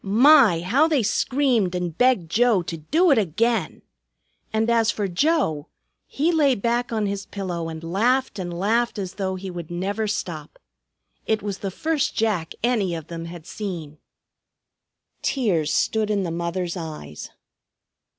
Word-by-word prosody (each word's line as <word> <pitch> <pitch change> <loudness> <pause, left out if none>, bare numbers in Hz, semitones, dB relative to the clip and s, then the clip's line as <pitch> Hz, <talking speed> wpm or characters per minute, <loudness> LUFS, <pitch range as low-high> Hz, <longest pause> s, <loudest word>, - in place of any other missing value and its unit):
My! 225 - +6
How 260 - +3
they 295 -7 +2
screamed 235 -4 +1
and 175 -3 -3
begged 225 -8 +2
Joe 230 -4 +3
to 165 -1 -5
"do 315 - +2
it 275 - +5
again." 220 +5 0 0.7
And 220 +1 +1
as 230 -1 +3
for 210 -3 -1
Joe, 180 - +1 0.4
he 310 +5 0
lay 290 -5 +3
back 235 +3 -1
on 220 -2 0
his 200 -1 -3
pillow 175 -4 -4
and 160 0 -7
laughed 225 +8 +1
and 175 -2 -4
laughed 220 +7 0
as 190 -2 -4
though 190 -1 -2
he 185 0 -6
would 175 -3 -7
never 200 +5 -2
stop. 165 -7 -4 0.7
It 220 -1 0
was 200 -2 -4
the 195 - -3
first 305 - -1
Jack 210 -8 -1
any 215 -8 +1
of 160 -2 -8
them 165 -1 -6
had 170 -1 -9
seen. 170 -9 -6 1.2
Tears 180 - 0
stood 220 -1 +1
in 205 -2 +1
the 170 - -3
mother's 170 +1 -3
eyes. 155 - -7
200 Hz, 155 wpm, -23 LUFS, 170-235 Hz, 1.2 s, My